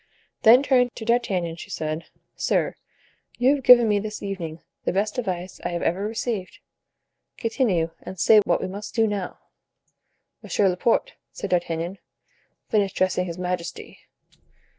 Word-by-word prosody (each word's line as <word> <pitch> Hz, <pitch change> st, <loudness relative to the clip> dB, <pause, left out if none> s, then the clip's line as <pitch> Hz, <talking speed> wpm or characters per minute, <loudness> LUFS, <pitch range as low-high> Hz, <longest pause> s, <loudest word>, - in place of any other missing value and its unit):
Then 240 Hz, +5 st, +7 dB
turning 250 Hz, -3 st, +3 dB
to 220 Hz, -, -7 dB
D'Artagnan, 190 Hz, -8 st, 0 dB
she -, -, -10 dB
said: 155 Hz, +1 st, -3 dB, 0.3 s
"Sir, -, -, 0 dB, 0.6 s
you 255 Hz, +3 st, +4 dB
have 280 Hz, -2 st, -3 dB
given 240 Hz, -2 st, +8 dB
me 210 Hz, -1 st, +2 dB
this 210 Hz, +1 st, -6 dB
evening 170 Hz, -5 st, -5 dB, 0.2 s
the -, -, 0 dB
best 210 Hz, +5 st, -1 dB
advice 185 Hz, -5 st, -4 dB
I -, -, -1 dB
have 170 Hz, -, -2 dB
ever 190 Hz, +5 st, 0 dB
received. 220 Hz, -3 st, -3 dB, 0.8 s
Continue, 210 Hz, -9 st, 0 dB
and 190 Hz, -, -9 dB
say 215 Hz, +6 st, +7 dB
what -, -, +1 dB
we -, -, -2 dB
must 200 Hz, +3 st, -7 dB
do 225 Hz, -2 st, +4 dB
now." 205 Hz, -4 st, -3 dB, 1.0 s
"Monsieur 200 Hz, -, +1 dB
Laporte," 230 Hz, -, +1 dB, 0.2 s
said -, -, -6 dB
D'Artagnan, 170 Hz, +1 st, -1 dB, 0.7 s
"finish 200 Hz, -3 st, +1 dB
dressing 185 Hz, -1 st, 0 dB
his 170 Hz, 0 st, -6 dB
majesty." 180 Hz, -1 st, -5 dB
195 Hz, 145 wpm, -24 LUFS, 180-225 Hz, 1.0 s, given